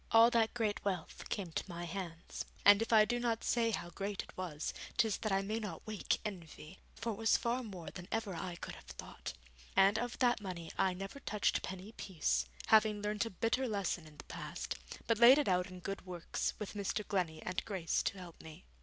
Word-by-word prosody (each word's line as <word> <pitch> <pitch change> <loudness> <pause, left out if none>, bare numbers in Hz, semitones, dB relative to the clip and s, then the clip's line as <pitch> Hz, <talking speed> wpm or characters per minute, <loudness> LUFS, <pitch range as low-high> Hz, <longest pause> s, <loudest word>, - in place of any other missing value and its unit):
All 230 +1 +8
that 230 -1 +3
great 215 -3 0
wealth 185 -5 -3
came 190 -5 -2
to - - -1
my 170 0 -5
hands, 170 -1 -5 0.2
and 205 +1 +9
if 225 - -1
I 215 -2 +8
do 240 +2 0
not 235 -2 0
say 235 -1 +2
how 175 -5 -3
great 200 +1 -3
it - - -15
was, 170 -5 -3 0.2
'tis 220 -3 +3
that 215 - -2
I 195 0 +2
may 215 +3 -1
not 200 -7 -6
wake 215 -2 0
envy, 170 -4 -7 0.2
for 230 0 -2
it 205 - -5
was 225 0 +4
far 240 +2 0
more 190 -8 -7
than 180 -1 -8
ever 225 -3 -1
I 175 +1 -4
could - - -7
have - - -12
thought. - - -7 0.4
And 195 +3 +6
of 240 +1 -3
that 245 -3 +3
money 180 -4 -5
I 190 -2 +2
never 195 +8 -6
touched 210 -5 +1
penny 190 +3 -6
piece, 150 - 0 0.2
having 215 -1 +5
learnt 210 +2 0
a - - -4
bitter 230 +6 0
lesson 195 -6 -1
in 150 -1 -15
the - - -9
past, - - -5 0.3
but 230 -1 +2
laid 245 +3 +10
it 295 - +2
out 180 0 +3
in 185 -1 -10
good 195 +2 -4
works, 180 -2 -2
with 210 - -5
Mr. 205 +1 -2
Glennie 170 -6 -1
and 180 +1 -2
Grace 190 -6 0
to 200 - -1
help 175 -3 -10
me. 160 +3 -11
200 Hz, 215 wpm, -35 LUFS, 180-225 Hz, 0.4 s, laid